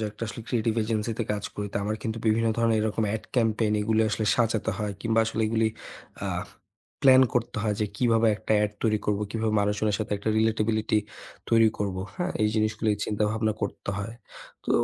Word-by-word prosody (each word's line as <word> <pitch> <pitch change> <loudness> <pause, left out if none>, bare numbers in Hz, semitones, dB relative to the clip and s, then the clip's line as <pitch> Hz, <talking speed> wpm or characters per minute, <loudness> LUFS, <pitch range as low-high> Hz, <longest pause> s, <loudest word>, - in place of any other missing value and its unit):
যে 110 - -1
একটা 105 - -12
আসলে 115 - -7
creative 115 -1 0
agency 110 0 -1
তে - - +1
কাজ 105 -1 -4
করি। 105 - -3
তো - - -2
আমার 105 +1 -1
কিন্তু 115 0 -3
বিভিন্ন 115 +1 +3
ধরনের 115 -1 +3
এরকম 110 +1 0
ad 110 - -11
campaign 110 -2 +2
এগুলি 110 +1 +2
আসলে 110 -1 -1
সাজাতে 115 -2 +1
হয় 105 -2 -2
কিংবা 115 +1 +2
আসলে 115 0 -2
এগুলি 110 0 +2 0.6
আ - - -1 0.8
প্ল্যান 130 -1 +8
করতে 120 -1 -1
হয় 105 -2 +1
যে, 105 - +2
কিভাবে 115 -1 +3
একটা 110 - -2
ad 105 - -3
তৈরি 110 -1 +3
করবো, 105 0 +1
কিভাবে 110 -1 -1
মানুষজনের 105 0 +1
সাথে 110 -1 -3
একটা 100 - -3
relatability 110 -1 +1 0.5
তৈরি 115 -1 +6
করবো, 95 -2 -2 0.2
হ্যাঁ? 180 0 -2
এই 105 - +4
জিনিসগুলিই 110 0 +1
চিন্তাভাবনা 110 +1 0
করতে 100 - -3
হয়। 110 +3 -5 0.5
তো - - -4
110 Hz, 190 wpm, -26 LUFS, 105-115 Hz, 0.8 s, প্ল্যান